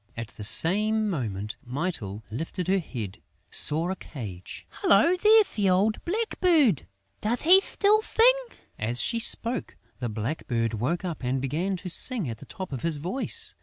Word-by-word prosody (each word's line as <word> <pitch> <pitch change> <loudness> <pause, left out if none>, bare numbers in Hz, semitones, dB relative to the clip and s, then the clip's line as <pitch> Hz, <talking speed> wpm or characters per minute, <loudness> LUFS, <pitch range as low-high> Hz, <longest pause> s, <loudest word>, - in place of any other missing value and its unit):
At 115 -1 -5
the 110 - -10
same 210 - +4
moment, 105 - -4
Mytyl, 125 - -4
lifting 165 - -4
her 190 +2 +2
head, 115 - -7 0.3
saw 165 +4 0
a - - -2
cage: 105 - -9 0.2
"Hullo, 220 - +4
there's 430 +3 +5
the 205 -3 +2
old 200 +4 +1
blackbird!... 345 - +1 0.3
Does 230 +3 -1
he 365 +5 +7
still 420 +2 +2
sing?" 470 +3 +4 0.4
As 115 +3 0
she 235 - +1
spoke, 230 +1 0 0.2
the 120 -2 -3
blackbird 115 0 -2
woke 130 - -2
up 170 -6 -5
and 130 +2 -1
began 160 +9 -2
to 180 +1 -7
sing 230 - +1
at 115 -2 -6
the - - -13
top 185 -6 -7
of 130 - -5
his 165 0 0
voice. 180 - -3
175 Hz, 165 wpm, -26 LUFS, -, 0.4 s, he